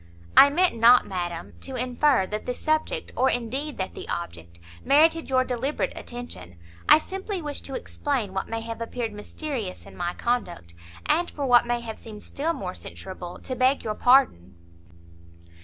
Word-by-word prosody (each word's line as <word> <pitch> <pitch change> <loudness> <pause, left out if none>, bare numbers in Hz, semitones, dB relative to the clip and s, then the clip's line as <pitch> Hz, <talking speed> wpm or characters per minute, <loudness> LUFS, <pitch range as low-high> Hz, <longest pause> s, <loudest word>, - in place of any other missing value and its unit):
"I 280 - +10
meant 350 0 +2
not, 235 +2 +6
madam, 175 -3 -4
to 265 - -5
infer, 255 -3 +2
that 210 +3 -5
the 250 - -1
subject 310 - -1
or 260 +1 +3
indeed 260 +5 -2
that 190 - -3
the - - -9
object 85 - -6 0.2
merited 320 +3 +4
your 255 -1 +3
deliberate 255 +3 -2
attention; 90 - -7 0.3
I - - +10
simply 385 +4 -4
wish 295 -3 -4
to 270 - -6
explain 255 -11 -2
what 190 - -3
may 225 0 -3
have 230 0 -6
appeared 230 -1 -3
mysterious 215 -1 -5
in - - -13
my 175 0 -3
conduct, 160 - -2 0.3
and 340 +3 +2
for 285 - -4
what 245 -2 +5
may 240 0 0
have 225 -2 -7
seemed 215 -2 -10
still 305 +4 -2
more 185 - -5
censurable, 180 -2 -8
to 255 - -3
beg 260 +2 +2
your 215 - -2
pardon." 210 - +3
245 Hz, 170 wpm, -25 LUFS, 195-280 Hz, 0.3 s, I